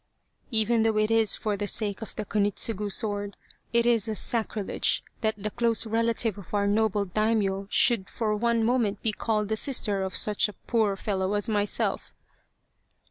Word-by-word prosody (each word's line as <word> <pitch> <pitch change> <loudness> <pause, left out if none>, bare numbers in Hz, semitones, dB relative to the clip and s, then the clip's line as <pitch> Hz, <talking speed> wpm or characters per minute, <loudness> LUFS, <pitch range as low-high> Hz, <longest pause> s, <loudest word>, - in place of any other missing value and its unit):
" - - -46
Even 225 0 +2
though 220 -1 +1
it 215 +1 +1
is 225 -2 +3
for 210 -1 -2
the 205 +1 -3
sake 205 -1 +1
of 225 - -8
the 215 - -4
Kunitsugu 205 0 0
sword, 205 -2 -3 0.3
it 235 0 +2
is 230 -3 +3
a 220 - -2
sacrilege 220 -1 0 0.2
that 220 -1 0
the 210 +1 -4
close 230 -1 +1
relative 225 -1 0
of 200 +1 -7
our 200 0 +1
noble 205 0 +1
Daimio 200 -1 0
should 225 -5 +2
for 215 -2 -1
one 230 +1 +1
moment 225 -4 0
be 220 - +2
called 210 0 -1
the 220 - -1
sister 215 -5 +1
of 190 -1 -4
such 210 0 +2
a - - -9
poor 220 -3 0
fellow 195 0 -2
as 205 - +1
myself." 205 -2 -1
215 Hz, 180 wpm, -26 LUFS, 205-225 Hz, 0.3 s, is